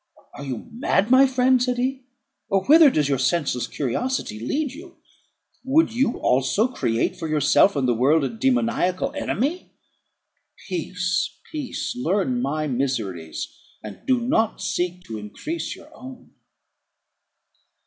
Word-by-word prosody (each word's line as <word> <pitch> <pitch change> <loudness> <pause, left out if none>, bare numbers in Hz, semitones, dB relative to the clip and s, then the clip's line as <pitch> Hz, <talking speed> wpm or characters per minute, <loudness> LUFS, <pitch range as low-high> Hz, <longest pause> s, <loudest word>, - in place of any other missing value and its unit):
"Are 145 - -9
you 135 - -5
mad, 225 -2 0
my 265 +1 +7
friend?" 255 -1 +3
said 250 0 0
he; 260 +1 -2 0.4
"or 195 -2 +1
whither 310 +1 +8
does 150 - +1
your 135 -2 0
senseless 135 -2 0
curiosity 145 - -2
lead 280 - -2
you? 340 +5 -12 0.7
Would 270 -1 +3
you 250 0 +1
also 135 - +2
create 120 - -1
for 165 - -5
yourself 155 +5 +4
and 135 -3 +1
the 120 - +3
world 140 +7 +3
a - - 0
demoniacal 230 -6 0
enemy? 295 - -2 1.0
Peace, 180 0 -2
peace! 290 -5 -4
learn 190 - 0
my 155 +4 -1
miseries, 115 - -3 0.4
and 105 -2 -9
do 255 -2 +3
not 235 -2 0
seek 180 -2 -2
to 110 -10 -7
increase 300 - -5
your - - -16
own." 255 -1 -12
190 Hz, 135 wpm, -23 LUFS, -, 1.0 s, whither